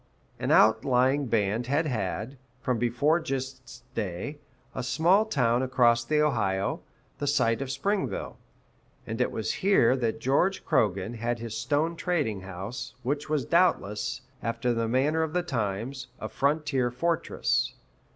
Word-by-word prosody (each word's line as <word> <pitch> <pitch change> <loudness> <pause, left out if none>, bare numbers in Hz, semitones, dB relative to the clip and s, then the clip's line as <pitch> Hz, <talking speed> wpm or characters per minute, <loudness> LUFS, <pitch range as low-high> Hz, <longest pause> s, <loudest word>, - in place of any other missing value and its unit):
An - - -2
outlying 125 +5 +4
band 110 +1 0
had 145 +5 +1
had, 115 0 -3 0.2
from 125 -2 -1
before 125 +8 +2
Gist's 130 -4 -5
day, 110 - -4 0.3
a - - -3
small 170 - +3
town 125 - +2
across 120 -3 +3
the 150 +4 +2
Ohio, 100 -9 0 0.4
the 145 - -2
site 115 -4 +2
of 135 - -3
Springville; 190 - -2 0.7
and 115 +2 -3
it - - +1
was 110 - -2
here 185 - +4
that 115 -4 -1
George 175 +10 +1
Croghan 105 - +1
had 120 +2 -1
his 115 -1 -6
stone 145 +8 0
trading 155 - -1
house, 95 +6 -7
which 145 +4 -2
was 150 -5 0
doubtless, 165 - +1 0.2
after 120 +2 -1
the 115 -1 0
manner 140 +7 +2
of 160 -1 -2
the 180 0 +1
times, 120 - -3
a 110 - -4
frontier 140 +1 0
fortress. 165 +7 0
125 Hz, 140 wpm, -27 LUFS, 115-150 Hz, 0.7 s, outlying